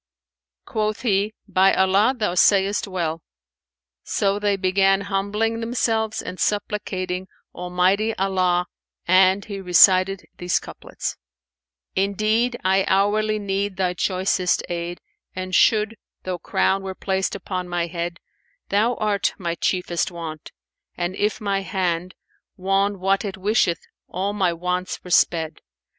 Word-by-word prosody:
Quoth 215 -2 -2
he, 205 -2 +1 0.2
"By 190 +1 +4
Allah, 195 +7 +3
thou 210 -6 0
sayest 200 +3 +3
well!" 170 -4 -3 0.8
So 200 -1 0
they 205 -1 +1
began 195 +1 +3
humbling 205 +3 -1
themselves 225 -2 -1
and 185 - -7
supplicating 190 -3 -2 0.3
Almighty 185 +5 +1
Allah 185 -2 +1 0.4
and 185 +2 +4
he 200 -3 -6
recited 185 +1 +5
these 175 0 +1
couplets, - - -6 0.8
"Indeed 215 +5 +1
I 190 +1 +3
hourly 215 +2 +2
need 200 -1 -2
thy 185 -2 0
choicest 185 0 0
aid, 175 0 -4 0.2
* - - -48
And 185 0 -5
should, 220 +2 +3 0.3
though 185 -1 -3
crown 190 +2 +1
were 190 -1 -6
placed 190 0 -1
upon 185 -2 -4
my 175 -1 0
head: 170 0 -4 0.5
Thou 220 +5 +2
art 210 -2 0
my 170 -3 -2
chiefest 175 0 -1
want, 165 -3 -8 0.5
and 175 +1 -2
if 210 +2 0
my 200 -3 0
hand 185 -2 -2 0.2
* - - -62
Won 195 +1 +1
what 195 +1 +1
it 200 -3 -5
wisheth, 190 -3 +1 0.3
all 195 +3 -2
my 190 -4 +1
wants 180 +2 -3
were 180 - -9
sped. 160 -2 +2
190 Hz, 130 wpm, -22 LUFS, 180-205 Hz, 0.8 s, recited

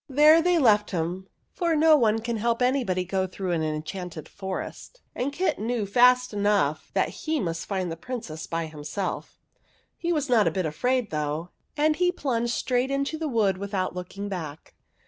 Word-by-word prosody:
There 300 +4 +6
they 355 +1 +3
left 210 -8 +4
him, 180 +2 -3 0.3
for 340 -3 0
no 315 +1 +6
one 225 -5 +2
can 230 0 -2
help 235 +2 +1
anybody 245 -9 +1
to 180 - -17
go 190 -1 +1
through 185 0 -4
an 165 -2 0
enchanted 155 +2 -4
forest, 190 - -6
and 265 +3 -2
Kit 360 +7 -1
knew 225 0 -1
fast 250 +3 +4
enough 205 -8 +1
that - - +2
he 315 -1 -2
must 165 -6 -3
find 185 -4 -2
the - - -3
Princess 170 -8 -6
by 165 0 -2
himself. 155 +5 -5 0.6
He 345 - -2
was 300 -4 0
not 235 -5 +4
a - - +5
bit 185 -3 -1
afraid, 245 +10 0
though, 150 +2 -2 0.3
and 305 +1 +3
he 360 0 +3
plunged 240 -8 -1
straight 250 +2 0
into 275 +3 -1
the 320 - -2
wood 210 -8 +1
without 200 -2 -2
looking 180 +3 -6
back. 160 -6 -6
210 Hz, 185 wpm, -26 LUFS, 180-260 Hz, 0.6 s, There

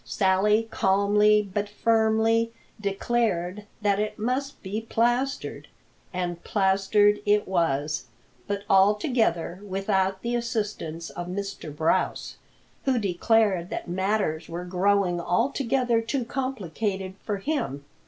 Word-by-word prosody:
Sally 210 +3 +2
calmly 210 +2 +3
but 205 0 -1
firmly 225 +1 +2 0.3
declared 200 -2 -1 0.2
that 200 -1 +2
it 210 0 -2
must 255 +5 -2
be 205 +3 -3
plastered, 240 +4 -1 0.4
and 175 -2 -3
plastered 205 +1 +3
it 210 0 +2
was, 155 -5 0 0.4
but 200 0 -2
altogether 195 - +2
without 195 -1 -1
the 235 +1 -1
assistance 210 -9 -3
of 175 0 -6
Mr. 195 -2 -5
Brouse, 160 +2 0 0.5
who 265 -2 +2
declared 200 -2 +2
that - - -5
matters 185 -3 -1
were 175 +1 -5
growing 180 -1 +1
altogether 240 +4 +1
too 240 +2 -2
complicated 205 -7 -3
for 205 -2 -2
him. 195 - -3
205 Hz, 110 wpm, -26 LUFS, 185-225 Hz, 0.5 s, calmly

